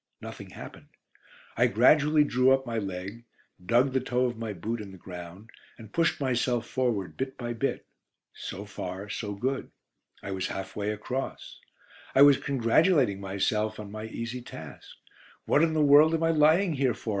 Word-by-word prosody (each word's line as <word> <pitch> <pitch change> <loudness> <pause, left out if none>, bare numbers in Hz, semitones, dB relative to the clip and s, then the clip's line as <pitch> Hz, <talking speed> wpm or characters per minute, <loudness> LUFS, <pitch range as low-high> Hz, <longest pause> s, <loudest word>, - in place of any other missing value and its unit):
Nothing - - -9
happened. - - -11 0.7
I - - +4
gradually 150 0 +4
drew 130 -2 +2
up 135 0 0
my 115 -2 -2
leg, 100 +3 -6 0.4
dug 120 +7 +2
the 130 - +2
toe 125 0 0
of 120 -1 -2
my 115 -1 -5
boot 110 +5 -4
in 100 -2 -9
the 95 - -12
ground, 90 +4 -10 0.3
and 110 -2 -13
pushed 165 0 +1
myself 125 -3 0
forward 105 -10 -1
bit 130 0 -4
by 120 -1 -4
bit. 115 - -2 0.5
So 100 - -7
far, 100 0 -6
so 105 -1 -4
good: 130 +6 -2 0.5
I 100 - -5
was 95 -1 -2
half 95 0 -6
way 105 0 -2
across. 125 +5 -5 0.6
I 135 - +8
was 145 -2 +7
congratulating 135 - +2
myself 105 +3 -1
on 105 -1 -8
my 110 +1 -6
easy 115 +2 -5
task. 80 - -10 0.6
"What 145 - +3
in 165 -1 +2
the 155 -1 +2
world 150 +3 +6
am 165 - -1
I 165 - +3
lying 160 +4 +4
here 130 -5 +1
for?" 115 - -7
120 Hz, 175 wpm, -28 LUFS, 100-135 Hz, 0.7 s, I